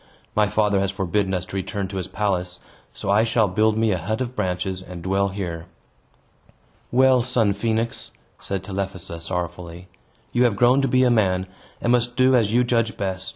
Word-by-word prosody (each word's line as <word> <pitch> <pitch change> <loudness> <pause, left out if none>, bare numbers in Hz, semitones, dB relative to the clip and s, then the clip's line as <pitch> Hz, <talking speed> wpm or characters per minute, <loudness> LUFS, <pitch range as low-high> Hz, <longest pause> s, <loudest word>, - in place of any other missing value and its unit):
My 105 -1 +3
father 105 -1 +2
has 100 0 0
forbidden 95 0 -1
us 90 0 -3
to 95 - -9
return 95 +1 -3
to 95 - -5
his 95 -1 -3
palace, 90 -3 -2 0.3
so 100 - -3
I 105 +2 +4
shall 110 -1 +2
build 110 +3 +2
me 110 -1 +2
a 90 - 0
hut 110 +7 -2
of 125 -1 -3
branches, 90 +1 -2
and 90 -2 -9
dwell 95 +2 +1
here." 90 -4 -5 1.2
"Well, 130 0 +5
son 115 -4 +1
Phoenix," 115 +2 -2 0.3
said 95 -1 -4
Telephassa, 95 -3 -4
sorrowfully, 85 +1 -5 0.4
"you 125 - +3
have 115 -4 +2
grown 125 +5 +4
to 135 - +1
be 130 0 +3
a 125 - +4
man, 95 -5 +2 0.3
and 120 - 0
must 120 0 +2
do 130 +1 +4
as 115 -5 +3
you 120 +2 +4
judge 115 -2 0
best. 95 -1 -3
100 Hz, 190 wpm, -23 LUFS, 95-115 Hz, 1.2 s, Well